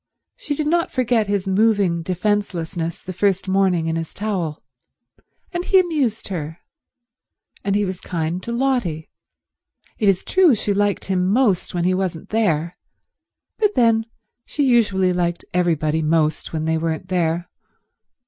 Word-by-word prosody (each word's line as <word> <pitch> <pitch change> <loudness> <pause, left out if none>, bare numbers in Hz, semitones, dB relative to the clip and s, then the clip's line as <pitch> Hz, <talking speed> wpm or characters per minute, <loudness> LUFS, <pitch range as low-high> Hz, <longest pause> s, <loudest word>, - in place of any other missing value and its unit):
She 290 - -4
did 305 - -2
not 335 +3 +1
forget 240 -4 +1
his 200 -1 -1
moving 195 -4 +2
defencelessness 180 -3 -2
the 185 - -6
first 195 +1 +1
morning 190 -3 +2
in 165 0 -1
his 165 -1 -5
towel, 185 -7 -3 0.9
and 350 -1 -2
he 380 - +4
amused 285 - 0
her, 160 -3 -4 1.1
and 200 0 0
he 205 0 +2
was 185 -1 -5
kind 170 +1 -3
to 235 - -5
Lotty. 235 - -1 0.9
It 210 -4 +3
is 190 -2 +1
true 365 -8 +4
she 205 -1 -1
liked 205 0 0
him 185 -1 0
most 210 -7 +1
when 175 - 0
he 185 +1 +2
wasn't 185 -4 -3
there, 175 -6 0 0.8
but 420 -2 +2
then 230 -2 +3 0.4
she 290 - -2
usually 205 -8 +3
liked 175 -1 -1
everybody 160 -3 +1
most 155 0 +1
when 155 -1 -2
they 160 0 +1
weren't 160 -1 -3
there. 175 -1 0
190 Hz, 150 wpm, -21 LUFS, 170-225 Hz, 1.1 s, he